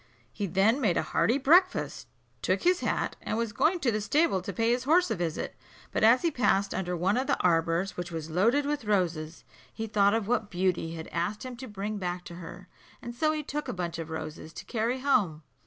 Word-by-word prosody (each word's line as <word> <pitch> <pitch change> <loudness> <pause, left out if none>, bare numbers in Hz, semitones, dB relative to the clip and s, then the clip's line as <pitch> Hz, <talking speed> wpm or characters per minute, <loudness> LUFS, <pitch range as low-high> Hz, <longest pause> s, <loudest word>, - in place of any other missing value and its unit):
He 205 - -3
then 200 - +2
made 195 -8 +2
a - - +1
hearty 165 - +1
breakfast, 345 +7 +3 0.3
took - - 0
his 360 +1 +3
hat, - - -1
and 220 - -2
was 230 -2 -2
going 310 +9 +2
to 240 - +2
the 215 -1 -1
stable 210 - +2
to - - -5
pay 230 0 +1
his 245 +1 0
horse 330 -1 +4
a - - +1
visit; 170 -3 -3 0.4
but - - -1
as 230 +3 +6
he 335 - +2
passed 200 -7 +1
under 180 -1 -2
one 190 +6 +1
of 260 +1 -1
the 280 - +1
arbours, 170 +2 +1
which 175 -1 -5
was 160 -1 -5
loaded 230 - +3
with 290 -4 -2
roses, 170 -6 -1 0.3
he 225 - -5
thought 205 -1 +3
of 225 -3 -1
what 225 -3 0
Beauty 180 -3 -1
had 160 -1 -7
asked 205 +8 -2
him 255 -1 -6
to 260 +1 -8
bring 205 0 -4
back 180 -1 -3
to 175 - -9
her, 180 +1 -10 0.3
and 240 - -7
so 310 +6 +1
he 305 -1 -2
took 295 +1 -4
a - - -3
bunch 175 -3 -4
of 165 -1 -5
roses 155 0 -6
to - - -9
carry 240 +3 -1
home. 195 - +1
205 Hz, 225 wpm, -28 LUFS, 175-250 Hz, 0.4 s, as